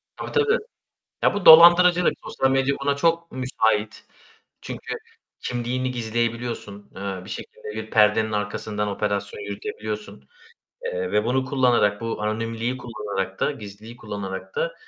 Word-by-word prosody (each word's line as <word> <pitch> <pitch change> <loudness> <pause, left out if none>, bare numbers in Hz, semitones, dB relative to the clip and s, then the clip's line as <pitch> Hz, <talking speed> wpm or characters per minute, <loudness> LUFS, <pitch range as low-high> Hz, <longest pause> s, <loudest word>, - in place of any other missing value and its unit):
Tabii, - - -7
tabii. 455 +1 +3 0.7
Ya - - +3
bu 205 - -3
dolandırıcılık, 175 +2 +8
sosyal 135 - 0
medya 135 +1 +2
buna 140 0 +1
çok 165 +2 +1
müsait. 110 -5 -1 0.6
Çünkü - - -6 0.4
kimliğini 125 +1 -2
gizleyebiliyorsun, 115 -3 -3
eee, 95 -1 -5
bir - - -11
şekilde - - -8
bir 110 0 -6
perdenin 110 0 +4
arkasından 105 0 -2
operasyon 100 0 -2
yürütebiliyorsun, 105 -4 -6 0.6
eee, 90 +1 -3
ve 105 +1 +2
bunu 130 +2 +1
kullanarak, 125 -6 +2
bu 115 -2 -4
anonimliği 115 +3 -2
kullanarak 105 -5 -5
da, - - +2
gizliliği 110 -2 -10
kullanarak 100 - -6
da - - -1
110 Hz, 130 wpm, -24 LUFS, 105-130 Hz, 0.7 s, dolandırıcılık